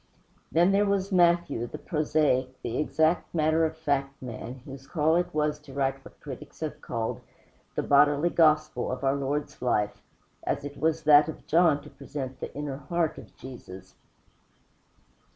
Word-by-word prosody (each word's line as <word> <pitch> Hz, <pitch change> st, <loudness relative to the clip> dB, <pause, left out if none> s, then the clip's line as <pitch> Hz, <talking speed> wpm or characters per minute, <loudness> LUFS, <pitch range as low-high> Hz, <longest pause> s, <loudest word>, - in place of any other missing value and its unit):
Then 175 Hz, +4 st, +4 dB
there 200 Hz, +1 st, +3 dB
was 200 Hz, 0 st, 0 dB
Matthew, 170 Hz, -9 st, +3 dB
the -, -, -7 dB
prosaic, 150 Hz, -5 st, 0 dB
the 115 Hz, -, -2 dB
exact 160 Hz, +3 st, +1 dB
matter 160 Hz, +1 st, +3 dB
of 160 Hz, 0 st, -3 dB
fact 140 Hz, -3 st, -1 dB
man, 125 Hz, +1 st, -7 dB
whose 135 Hz, 0 st, -10 dB
call 160 Hz, +2 st, +2 dB
it 175 Hz, +1 st, +1 dB
was 150 Hz, 0 st, 0 dB
to 150 Hz, -2 st, -14 dB
write 135 Hz, 0 st, -1 dB
what -, -, -15 dB
critics 135 Hz, +1 st, -10 dB
have 155 Hz, -2 st, -4 dB
called 115 Hz, -1 st, -3 dB, 0.5 s
the -, -, 0 dB
bodily 145 Hz, +3 st, +4 dB
gospel 155 Hz, -6 st, +3 dB
of 130 Hz, +1 st, -5 dB
our 135 Hz, 0 st, +3 dB
Lord's 140 Hz, +2 st, -3 dB
life, 105 Hz, -4 st, 0 dB, 0.4 s
as 145 Hz, -, -2 dB
it 145 Hz, 0 st, -7 dB
was 160 Hz, 0 st, +1 dB
that 150 Hz, +1 st, +6 dB
of 160 Hz, -, -8 dB
John 160 Hz, -3 st, +3 dB
to 150 Hz, -, -12 dB
present 135 Hz, -3 st, -7 dB
the -, -, -5 dB
inner 145 Hz, -2 st, -4 dB
heart 160 Hz, +3 st, -1 dB
of -, -, -15 dB
Jesus. 120 Hz, -8 st, -11 dB
150 Hz, 165 wpm, -27 LUFS, 135-160 Hz, 0.5 s, that